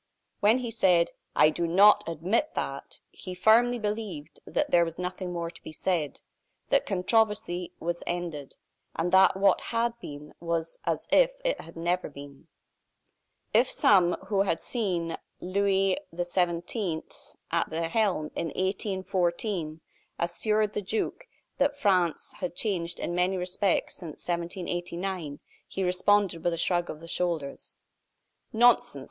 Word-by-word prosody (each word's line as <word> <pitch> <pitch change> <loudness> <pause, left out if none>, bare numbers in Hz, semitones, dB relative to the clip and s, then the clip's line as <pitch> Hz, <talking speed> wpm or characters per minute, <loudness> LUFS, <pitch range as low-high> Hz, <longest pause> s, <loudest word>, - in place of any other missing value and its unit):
When 215 +4 +5
he 245 -3 -4
said: 180 -6 +3 0.2
"I 155 - +6
do 170 +2 -1
not 205 +4 +6
admit 185 - -1
that!" - - -5
he 185 -1 -8
firmly 230 +6 +4
believed 210 -8 -4
that - - -1
there 170 -1 +6
was 165 -1 -4
nothing 180 0 -4
more 170 -1 -3
to 165 - -13
be - - -9
said; 155 -3 -2 0.5
that - - +2
controversy 190 -2 +1
was 175 +1 -3
ended; 170 -5 -4 0.4
and 170 +2 -1
that 190 0 +6
what 195 -1 +4
had 235 0 +1
been 150 -6 -9
was 165 -1 -3
as - - -1
if - - +5
it - - 0
had 165 - -13
never 175 +1 -1
been. 140 -1 -12 1.1
If 235 +4 +4
some, 180 -4 +4
who 195 -1 +1
had 180 -4 +1
seen 180 -8 -2 0.2
Louis 195 0 +1 0.2
XVII. 175 0 -1 0.5
at 170 0 +1
the 165 +1 -2
helm 180 -6 0
in 170 - -2
1814, 185 -2 -2 0.4
assured 210 +5 0
the - - -2
duke 210 +3 -3 0.3
that 285 +1 +2
France 185 - +1
had 180 -2 -4
changed 175 -5 -2
in 175 - -3
many 180 +2 +1
respects 180 +1 0
since 165 -4 -9
1789, 175 -2 -3 0.3
he 190 - -3
responded 185 -1 +2
with 175 - +1
a - - -3
shrug 175 0 +1
of 155 - -7
the 165 - -10
shoulders: 170 -5 -2 0.8
"Nonsense! 235 -10 +4
180 Hz, 140 wpm, -28 LUFS, 170-205 Hz, 1.1 s, I